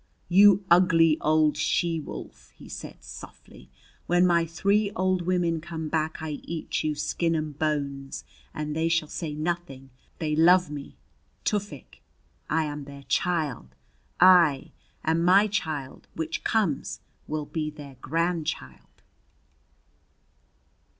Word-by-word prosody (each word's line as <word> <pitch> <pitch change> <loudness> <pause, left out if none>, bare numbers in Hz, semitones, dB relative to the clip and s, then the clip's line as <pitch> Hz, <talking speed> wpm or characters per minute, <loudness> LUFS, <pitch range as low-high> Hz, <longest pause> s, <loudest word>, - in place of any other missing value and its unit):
"You 200 +1 +6
ugly 165 -3 +5
old 155 -1 +3
she 170 -2 0
wolf!" 150 - -9
he - - -14
said - - -9
softly. 60 +1 -12 0.4
"When 175 +1 +4
my 170 -2 +3
three 200 +5 +1
old 185 -1 +1
women 175 -3 +1
come 160 -1 -5
back 160 0 -2
I 150 -2 -4
eat 165 -1 -4
you, 155 -1 -1
skin 165 +3 -1
and 155 -2 -4
bones, 140 -3 -2 0.3
and 150 0 -4
they 165 +1 +1
shall 165 -2 +1
say 155 -4 -4
nothing! 155 -5 -4 0.3
They 155 -1 -1
love 175 +1 +5
me 145 -1 -8 0.5
Tufik! 205 - -4 0.5
I 160 +1 +2
am 145 -1 -5
their 140 0 -11
child. 140 - -1 0.4
Aye! 175 -7 +5 0.3
And 165 +1 +1
my 190 +4 +6
child 155 -10 -4
which 330 +1 -3
comes 205 - -1 0.3
will 155 -1 -3
be 155 0 -3
their 145 -3 -11
grandchild!" 160 - -3
160 Hz, 125 wpm, -26 LUFS, 150-175 Hz, 0.5 s, You